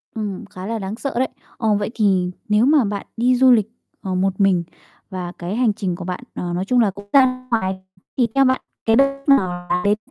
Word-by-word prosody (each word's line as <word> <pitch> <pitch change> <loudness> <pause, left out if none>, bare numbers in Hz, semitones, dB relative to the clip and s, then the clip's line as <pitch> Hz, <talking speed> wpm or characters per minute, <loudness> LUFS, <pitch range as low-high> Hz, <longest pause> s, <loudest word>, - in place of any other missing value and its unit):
Ừm, 210 -1 -4
khá 185 -1 -9
là 225 +1 -3
đáng 195 +2 -4
sợ 275 +3 -4
đấy. 260 - +2 0.3
Ờ, 220 -3 +1
vậy 205 - -2
thì 190 -5 +1 0.2
nếu 210 +3 +4
mà 290 -1 +5
bạn 200 0 -4
đi 250 +2 +3
du 260 0 +6
lịch, 220 -3 +4 0.3
ờ, 185 -1 -3
một 190 +1 0
mình, 190 -3 +3 0.5
và 180 -2 -5
cái 175 +4 -4
hành 230 -3 +2
trình 190 -4 -3
của 175 - -7
bạn, 180 0 -5
ờ, 175 -1 -3
nói 185 +2 -2
chung 250 +3 +2
là 210 -4 +3
cũng 200 +1 -13
ra 255 -2 +4
ngoài, 190 -4 0 0.4
thì 245 -2 +3
theo 275 0 +5
bạn 260 0 +2 0.2
cái 225 0 +4
đất 275 - +6 0.2
nước 275 - +8
nào 175 -1 -4 0.2
đến? 205 0 +2
205 Hz, 230 wpm, -20 LUFS, 185-245 Hz, 0.5 s, nước